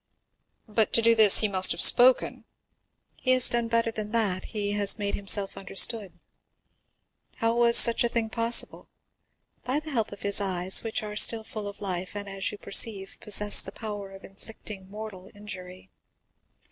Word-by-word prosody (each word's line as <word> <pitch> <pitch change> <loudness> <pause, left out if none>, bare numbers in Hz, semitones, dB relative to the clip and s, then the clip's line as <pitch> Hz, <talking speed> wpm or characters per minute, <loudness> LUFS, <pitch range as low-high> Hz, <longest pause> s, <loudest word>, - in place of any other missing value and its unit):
"But 215 0 -3
to 230 - +1
do 230 0 +3
this 220 -3 +5
he 215 - -1
must 190 -2 +4
have - - -11
spoken?" 250 +1 +3 0.7
"He 255 - -1
has 255 -1 +3
done 235 -1 -3
better 230 0 -2
than 215 -1 -8
that—he 205 -1 -4
has 205 -1 0
made 200 -1 -5
himself 200 0 0
understood." 195 -1 -2 1.2
"How 230 0 -3
was 235 0 +5
such 235 0 +6
a 235 - -2
thing 230 -1 -4
possible?" 230 +1 +1 0.7
"By 260 +4 -3
the 310 0 -11
help 225 -5 -4
of 205 - -12
his 200 0 +1
eyes, 185 -1 -1
which 225 -1 -5
are 210 0 -9
still 220 +1 +4
full 215 -3 -9
of 200 +1 -12
life, 185 -1 -7
and, 205 0 -8
as 195 0 -5
you 210 - -11
perceive, 200 -1 -1
possess 210 0 +4
the - - -9
power 205 -3 -9
of 195 0 -16
inflicting 195 -1 -12
mortal 205 -3 -12
injury." 185 -3 -12
210 Hz, 170 wpm, -24 LUFS, 195-230 Hz, 1.2 s, such